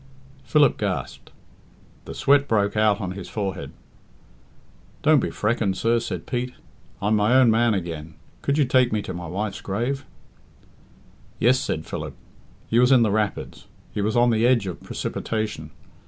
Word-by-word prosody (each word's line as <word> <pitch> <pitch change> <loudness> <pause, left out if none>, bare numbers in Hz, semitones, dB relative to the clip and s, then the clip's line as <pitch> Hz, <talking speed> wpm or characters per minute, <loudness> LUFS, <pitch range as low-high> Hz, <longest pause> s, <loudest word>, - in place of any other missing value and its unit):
Philip 145 -4 +3
gasped; - - -3 0.8
the - - -8
sweat 140 0 +3
broke 100 -2 +1
out 105 -1 +3
on 95 -4 -3
his 95 -1 -7
forehead. 100 -3 -4 1.3
"Don't 155 -1 +5
be - - -1
freckened, 105 -3 -1
sir," 115 +1 +2
said 115 - -5
Pete; 125 0 -3 0.5
"I'm 105 +2 +3
my 105 +4 +3
own 130 -3 +6
man 115 0 +3
again. 80 -4 -5 0.3
Could 140 +1 0
you 150 - +4
take 125 -1 +3
me 105 -1 -1
to 95 - -5
my 85 -1 -6
wife's 100 +4 -4
grave?" 120 +8 -2 1.3
"Yes," 125 +3 +3
said 80 - -3
Philip. - - -6 0.5
He 115 - +2
was 125 +2 +5
in 125 -3 +6
the 110 - +1
rapids. 105 -1 -2 0.2
He 105 - -3
was 110 +4 0
on 120 0 +4
the 110 0 +1
edge 120 -5 +3
of 90 -3 -6
precipitation. 105 -9 -4
110 Hz, 160 wpm, -24 LUFS, 100-125 Hz, 1.3 s, own